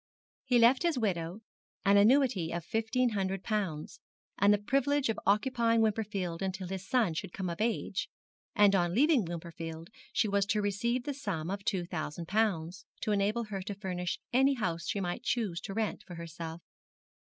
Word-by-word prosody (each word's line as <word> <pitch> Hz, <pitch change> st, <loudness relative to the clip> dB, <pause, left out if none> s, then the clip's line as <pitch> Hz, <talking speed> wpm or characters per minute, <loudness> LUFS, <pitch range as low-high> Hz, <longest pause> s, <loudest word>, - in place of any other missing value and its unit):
He 250 Hz, -2 st, +3 dB
left 240 Hz, +3 st, +6 dB
his 340 Hz, -5 st, +1 dB
widow 185 Hz, -3 st, -1 dB, 0.4 s
an 200 Hz, +1 st, +5 dB
annuity 210 Hz, -, +4 dB
of 170 Hz, -1 st, -4 dB
fifteen 225 Hz, +5 st, +1 dB
hundred 195 Hz, -3 st, -2 dB
pounds, 190 Hz, -8 st, -2 dB, 0.4 s
and 200 Hz, +1 st, +6 dB
the 205 Hz, -, +5 dB
privilege 275 Hz, +5 st, +1 dB
of 225 Hz, -, -1 dB
occupying 230 Hz, +2 st, +3 dB
Wimperfield 200 Hz, -5 st, -1 dB
until 190 Hz, -1 st, -3 dB
his 190 Hz, +1 st, -5 dB
son 230 Hz, -9 st, +2 dB
should 160 Hz, -, -4 dB
come 185 Hz, -3 st, -3 dB
of 170 Hz, -, -5 dB
age, 230 Hz, +1 st, -1 dB, 0.5 s
and 205 Hz, -2 st, +6 dB
on 175 Hz, -2 st, +2 dB
leaving 280 Hz, -, +4 dB
Wimperfield 165 Hz, 0 st, -7 dB, 0.2 s
she 220 Hz, -, +2 dB
was 200 Hz, -1 st, +1 dB
to 210 Hz, -, +1 dB
receive 235 Hz, +5 st, 0 dB
the 285 Hz, -, -3 dB
sum 190 Hz, -, -3 dB
of 200 Hz, 0 st, -4 dB
two 190 Hz, -3 st, 0 dB
thousand 165 Hz, -1 st, -5 dB
pounds, 185 Hz, -5 st, 0 dB, 0.2 s
to 215 Hz, -, -1 dB
enable 205 Hz, +3 st, +1 dB
her 205 Hz, -3 st, -5 dB
to 205 Hz, +2 st, -5 dB
furnish 180 Hz, -3 st, -3 dB, 0.2 s
any 270 Hz, +2 st, +4 dB
house 170 Hz, -8 st, -2 dB
she 205 Hz, -, -1 dB
might 175 Hz, -2 st, -2 dB
choose 210 Hz, -9 st, -1 dB
to 195 Hz, -, -6 dB
rent 220 Hz, -1 st, -1 dB
for 175 Hz, -, -8 dB
herself. 165 Hz, 0 st, -7 dB
200 Hz, 175 wpm, -31 LUFS, 175-225 Hz, 0.5 s, left